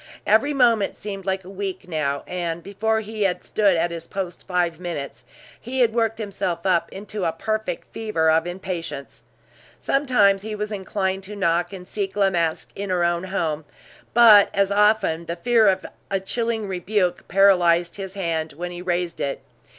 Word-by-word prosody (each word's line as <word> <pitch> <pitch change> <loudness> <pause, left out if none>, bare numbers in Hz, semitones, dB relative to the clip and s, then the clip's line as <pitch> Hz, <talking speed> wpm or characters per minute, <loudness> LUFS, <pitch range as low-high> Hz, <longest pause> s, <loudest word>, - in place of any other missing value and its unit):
Every 225 +8 +4
moment 235 -7 +3
seemed 195 -2 -7
like 190 0 -1
a 180 - -11
week 195 -1 -5
now; 140 -4 -1
and 170 -2 -3
before 220 +3 0
he 215 0 -7
had 180 -3 +1
stood 200 -5 +2
at 170 +1 0
his 165 -1 -7
post 185 -3 -5
five 175 -3 0
minutes, 170 -6 -6 0.3
he 255 +2 -2
had 230 -2 +3
worked 225 -1 +1
himself 195 -5 -3
up 180 -3 +2
into 205 0 -6
a 165 - +1
perfect 215 +1 -3
fever 190 -8 +1
of 165 +2 +2
impatience. 175 -5 -6 0.6
Sometimes 230 -9 +3
he 215 +1 -5
was 210 0 -4
inclined 190 -1 -2
to 210 +2 -8
knock 175 -3 +1
and 180 -2 -9
seek 195 -2 -3
La 200 -2 +3
Masque 165 -3 -1
in 200 0 -5
her 180 -1 +1
own 170 +1 0
home; 165 -5 -2 0.5
but 220 -4 +8
as 200 0 +2
often 205 -5 +2
the 170 - -3
fear 225 +4 +3
of 190 -1 +2 0.2
a 195 - 0
chilling 225 +2 -2
rebuke 185 -1 -1
paralyzed 175 -3 +4
his 195 -1 -6
hand 165 -4 -2
when 175 +4 -5
he 175 0 -7
raised 175 -1 -2
it. 140 - -3
190 Hz, 175 wpm, -23 LUFS, 175-210 Hz, 0.6 s, but